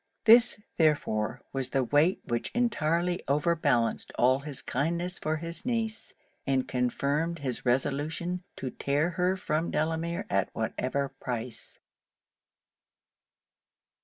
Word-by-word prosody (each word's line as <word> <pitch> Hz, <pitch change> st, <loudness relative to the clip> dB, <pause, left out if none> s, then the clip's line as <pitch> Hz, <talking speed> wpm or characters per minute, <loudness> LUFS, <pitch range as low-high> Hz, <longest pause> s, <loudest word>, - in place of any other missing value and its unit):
This, 230 Hz, 0 st, +7 dB, 0.2 s
therefore, 145 Hz, -9 st, +1 dB
was 135 Hz, -2 st, -1 dB
the 135 Hz, -, +1 dB
weight 145 Hz, +8 st, +3 dB
which 120 Hz, -1 st, -2 dB
entirely 175 Hz, -7 st, +1 dB
over 150 Hz, +5 st, +2 dB
balanced 125 Hz, -8 st, +1 dB
all 130 Hz, +2 st, +4 dB
his 140 Hz, -1 st, -6 dB
kindness 170 Hz, +6 st, -1 dB
for 155 Hz, 0 st, -1 dB
his 165 Hz, +2 st, -4 dB
niece, 225 Hz, -3 st, -2 dB, 0.3 s
and 135 Hz, -1 st, +1 dB
confirmed 140 Hz, +6 st, 0 dB
his 130 Hz, -4 st, -3 dB
resolution 145 Hz, +7 st, 0 dB
to 130 Hz, -2 st, -5 dB
tear 145 Hz, +5 st, 0 dB
her 180 Hz, +2 st, +1 dB
from 160 Hz, -2 st, -1 dB
Delamere 165 Hz, +2 st, -1 dB
at 100 Hz, -1 st, +1 dB
whatever 130 Hz, +5 st, -1 dB
price. 125 Hz, -3 st, -6 dB
150 Hz, 115 wpm, -29 LUFS, 130-170 Hz, 0.3 s, This